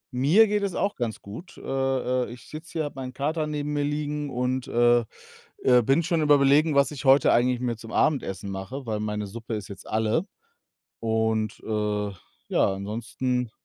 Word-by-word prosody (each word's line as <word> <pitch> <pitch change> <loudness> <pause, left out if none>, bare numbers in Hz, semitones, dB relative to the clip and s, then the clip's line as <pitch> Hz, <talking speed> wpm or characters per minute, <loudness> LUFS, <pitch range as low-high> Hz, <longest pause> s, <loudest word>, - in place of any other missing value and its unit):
Mir 160 - +5
geht 210 0 0
es 200 -3 -2
auch 200 - 0
ganz 120 -3 -3
gut. 135 - -10
Äh, - - -11
äh, 130 -2 0
ich 120 - -11
sitze 160 +3 -9
hier, 160 -2 -1
habe 145 - -5
meinen 130 0 -6
Kater 155 +4 -1
neben 150 -1 -3
mir 145 - 0
liegen 150 0 -2
und, 125 0 -1
äh, 120 0 +3 0.6
äh, 125 -1 +6
bin 135 +8 +2
schon 170 -2 +1
am 150 - 0
Überlegen, 145 +2 +5
was 140 0 +4
ich 150 -1 -7
heute 135 +2 +6
eigentlich 125 +1 +2
mir 120 -2 -2
zum 115 0 -10
Abendessen 100 -9 0
mache, 120 +8 -6
weil 110 -2 -2
meine 105 0 -2
Suppe 115 +2 -6
ist 105 -2 -6
jetzt 95 -2 -10
alle. 110 - 0 0.7
Und, 110 -1 0
äh, 105 -1 -1 0.4
ja, 95 - +2
ansonsten 120 +4 -2
125 Hz, 185 wpm, -26 LUFS, 110-150 Hz, 0.7 s, äh